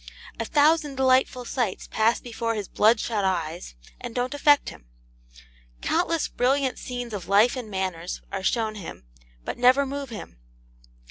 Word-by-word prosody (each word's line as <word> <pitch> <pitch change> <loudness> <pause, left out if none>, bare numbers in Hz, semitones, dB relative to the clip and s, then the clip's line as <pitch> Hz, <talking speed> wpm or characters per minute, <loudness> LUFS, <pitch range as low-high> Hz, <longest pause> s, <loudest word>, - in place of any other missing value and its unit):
A 230 - -1
thousand 295 +1 +3
delightful 260 -1 +2
sights 235 -6 -2
pass 225 +2 +1
before 230 -1 -3
his 205 -3 -4
bloodshot 215 -1 +2
eyes, 170 - -2 0.2
and 245 -2 -7
don't 250 +2 -1
affect 290 0 +4
him. - - -13 1.0
Countless 335 -2 +1
brilliant 265 +1 0
scenes 245 -2 -6
of 185 -4 -5
life 210 +6 +4
and 245 -4 -6
manners 185 -3 -3
are 195 - -3
shown 220 +3 0
him, 175 - -9 0.4
but - - -5
never 255 +3 +5
move 280 0 -5
him. 210 - -9
235 Hz, 145 wpm, -25 LUFS, 200-265 Hz, 1.0 s, never